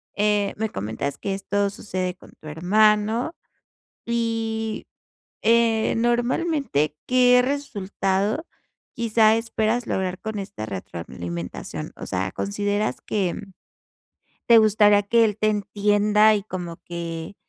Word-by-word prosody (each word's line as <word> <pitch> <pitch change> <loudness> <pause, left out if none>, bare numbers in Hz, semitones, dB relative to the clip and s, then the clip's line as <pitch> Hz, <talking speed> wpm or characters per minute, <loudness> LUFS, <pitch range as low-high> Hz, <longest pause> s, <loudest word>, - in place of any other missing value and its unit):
Eh, 205 -1 +1
me 220 0 -1
comentas 110 +8 -4
que 195 -1 -2
esto 200 +1 -1
sucede 185 -2 -4
con - - -17
tu 155 - -12
hermano 210 - +2 0.7
y, 225 -1 -2 0.6
eh, 225 0 +3
normalmente, 240 - 0
¿qué 250 0 +5
resultado 215 - -1 0.5
quizá 225 -1 +3
esperas 225 +1 -1
lograr 185 -1 -2
con 220 -2 -4
esta 195 - -6
retroalimentación? 85 -2 -6
O - - -8
sea, 95 +1 -2
¿consideras 205 +1 -2
que 190 -5 -2 1.1
te 235 -1 +8
gustaría 210 -1 +5
que 230 +3 +4
él 210 -1 -1
te 215 - +1
entienda 210 +1 +3
y 205 -2 -1
como 175 -4 -6
que, 170 +1 -6
210 Hz, 115 wpm, -23 LUFS, 185-225 Hz, 1.1 s, te